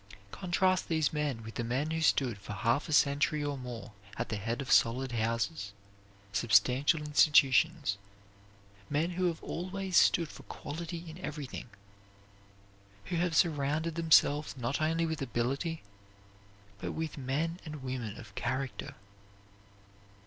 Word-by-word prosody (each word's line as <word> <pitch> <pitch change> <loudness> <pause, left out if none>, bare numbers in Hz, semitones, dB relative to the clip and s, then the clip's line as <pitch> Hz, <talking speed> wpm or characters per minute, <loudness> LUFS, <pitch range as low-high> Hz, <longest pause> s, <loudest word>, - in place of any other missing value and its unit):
Contrast 185 0 +1
these 160 -3 +1
men 145 -7 -2
with 110 0 -8
the 120 - -3
men 130 +7 -1
who 160 0 -1
stood 125 -8 +2
for 100 - -7
half 115 - 0
a - - -3
century 145 +1 +3
or 145 -1 -2
more 125 -4 -7 0.3
at - - -3
the - - -2
head 115 +5 -3
of 140 - -4
solid 125 +3 +3
houses, 115 +1 -1 0.6
substantial 125 +9 +3
institutions; 150 -4 +4 0.9
men 155 +4 0
who 180 +1 -1
have 170 -2 -1
always 185 +1 -4
stood 170 -1 +5
for - - -12
quality 170 +2 -7
in 160 +2 -9
everything; 150 -8 -6 1.4
who 175 - -3
have 170 -1 0
surrounded 155 0 +1
themselves 155 -3 +3
not 125 +4 -2
only 165 +2 +1
with 160 -2 -3
ability 135 +6 -2 1.0
but - - -4
with 160 -1 -3
men 150 +6 -2
and 150 -4 -8
women 125 -5 -4
of 105 -5 -11
character. 130 -1 -3
145 Hz, 135 wpm, -31 LUFS, 125-165 Hz, 1.4 s, stood